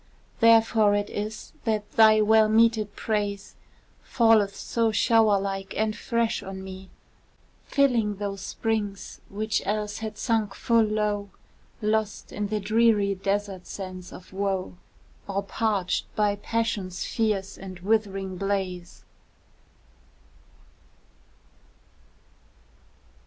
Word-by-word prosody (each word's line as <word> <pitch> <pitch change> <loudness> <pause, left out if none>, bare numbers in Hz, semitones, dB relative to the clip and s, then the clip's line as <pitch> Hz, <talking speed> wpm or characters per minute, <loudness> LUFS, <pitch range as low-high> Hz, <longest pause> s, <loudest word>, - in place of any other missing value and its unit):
Therefore 225 -2 +5
it 205 0 -2
is 210 +1 -5
that 215 -2 -1
thy 220 -1 +6
well 215 0 +5
meted 220 -2 +3
praise 205 -2 -2 0.5
Falleth 220 -4 +3
so 230 +1 0
shower 220 -2 +4
like 195 0 -4
and 215 0 0
fresh 235 -1 -1
on 190 -1 -7
me, 190 0 -9 0.8
Filling 240 -7 +2
those 200 -1 -4
springs 205 -1 -3
which 215 +1 -1
else 210 0 -2
had 215 -1 -6
sunk 220 -4 0
full 230 -1 +3
low, 210 -1 0 0.5
Lost 215 -1 -1
in 205 0 -3
the 215 +1 -1
dreary 210 -1 +3
desert 195 -1 -3
sands 185 -2 -7
of 180 - -12
woe, 190 -2 -2 0.5
Or 200 0 -2
parched 200 -3 -1
by 210 -1 +2
passion's 205 -4 -2
fierce 210 -4 -1
and 185 -1 -9
withering 195 -2 -1
blaze. 185 -3 -3
205 Hz, 105 wpm, -26 LUFS, 195-220 Hz, 0.8 s, thy